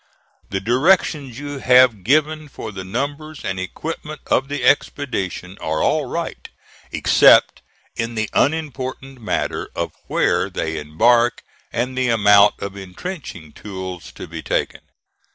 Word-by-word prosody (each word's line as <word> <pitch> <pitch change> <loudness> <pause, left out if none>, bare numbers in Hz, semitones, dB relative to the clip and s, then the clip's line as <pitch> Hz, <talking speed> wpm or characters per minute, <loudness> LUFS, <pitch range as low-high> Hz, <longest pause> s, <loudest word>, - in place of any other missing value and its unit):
The 95 - -1
directions 135 - +2
you 145 0 -6
have 125 -6 +5
given 155 +5 +1
for 110 -4 -7
the 95 -2 -7
numbers 145 +9 -4
and 95 -1 -2
equipment 155 - -6
of 135 - +1
the 145 -2 -4
expedition 100 -9 0
are 80 0 -1
all - - +2
right, - - -5 0.4
except - - +5 0.3
in 115 0 -3
the 110 0 -1
unimportant 135 -4 -1
matter 110 - -2
of - - -2 0.2
where - - +1
they 80 0 -3
embark 115 +11 +2 0.3
and 125 +2 -2
the 130 -1 +1
amount 105 -2 +5
of 100 0 -5
intrenching 95 - -8
tools 95 -4 -7
to - - -8
be - - -7
taken. - - -2
120 Hz, 135 wpm, -20 LUFS, 100-145 Hz, 0.4 s, have